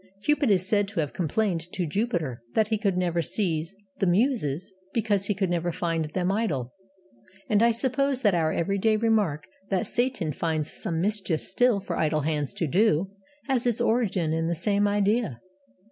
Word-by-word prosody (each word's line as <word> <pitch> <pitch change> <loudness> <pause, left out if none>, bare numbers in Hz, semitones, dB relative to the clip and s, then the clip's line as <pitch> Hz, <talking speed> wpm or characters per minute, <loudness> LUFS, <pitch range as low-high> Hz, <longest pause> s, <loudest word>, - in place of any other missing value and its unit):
Cupid 295 -1 +2
is 185 -2 +2
said 205 -1 +2
to 200 -3 -4
have 150 -3 -1
complained 175 0 -1
to 180 - -1
Jupiter 165 - -2
that 215 -1 +2
he 220 -2 0
could 200 -4 0
never 175 -2 +1
seize 165 -1 -1 0.2
the 195 - +2
Muses 190 - +1 0.2
because 205 -4 +1
he 205 - 0
could 190 -2 -1
never 175 0 0
find 165 -2 -1
them 180 +4 -1
idle. 150 - -1 0.8
And 210 -1 +3
I 235 - +5
suppose 265 +3 0
that 205 -3 +4
our 160 -2 +1
everyday 200 +6 +1
remark 210 -9 +1 0.2
that 190 -2 0
'Satan 240 - 0
finds 155 0 -2
some 165 -6 -2
mischief 195 -5 0
still 245 -4 +2
for 185 -3 -4
idle 155 -1 +1
hands 150 -4 -1
to - - -1
do' 190 +2 +2 0.3
has 255 -3 0
its 235 -2 +1
origin 195 -9 +1
in 165 0 0
the 170 - 0
same 205 +4 +2
idea. 205 - +1
190 Hz, 175 wpm, -26 LUFS, 165-220 Hz, 0.8 s, I